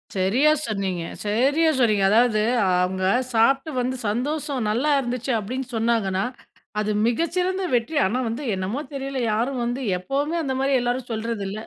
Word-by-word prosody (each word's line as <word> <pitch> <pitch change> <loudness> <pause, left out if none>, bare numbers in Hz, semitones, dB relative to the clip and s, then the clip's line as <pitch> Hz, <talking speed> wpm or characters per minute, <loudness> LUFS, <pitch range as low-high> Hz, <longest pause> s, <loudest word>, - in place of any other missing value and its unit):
சரியா 230 +11 +3
சொன்னீங்க. 195 -5 -2 0.2
சரியா 275 +10 +2
சொன்னீங்க. 215 -5 +3
அதாவது 220 0 +4 0.4
அவுங்க 185 0 -1 0.3
சாப்பிட்டு 270 +7 +3
வந்து 255 +1 -1
சந்தோசம் 280 +3 -2
நல்லா 260 +8 +1
இருந்துச்சு 250 0 -3
அப்படின்னு 255 +5 -4
சொன்னாங்கனா, 220 -4 +1 0.6
அது 215 0 0 0.2
மிகச் 330 +8 0
சிறந்த 375 +1 0
வெற்றி. 240 +7 -1
ஆனா 235 +7 0
வந்து 250 +6 -4
என்னமோ 195 +10 -3
தெரியல, 275 -1 -3
யாரும் 240 +4 -1
வந்து 245 +3 -2 0.2
எப்பவுமே 285 - -1
அந்த 265 -2 -2
மாரி 275 0 +1
எல்லாரும் 245 0 -2
சொல்றது 225 -2 -3
இல்ல. 210 +2 -5
245 Hz, 150 wpm, -23 LUFS, 215-275 Hz, 0.6 s, அதாவது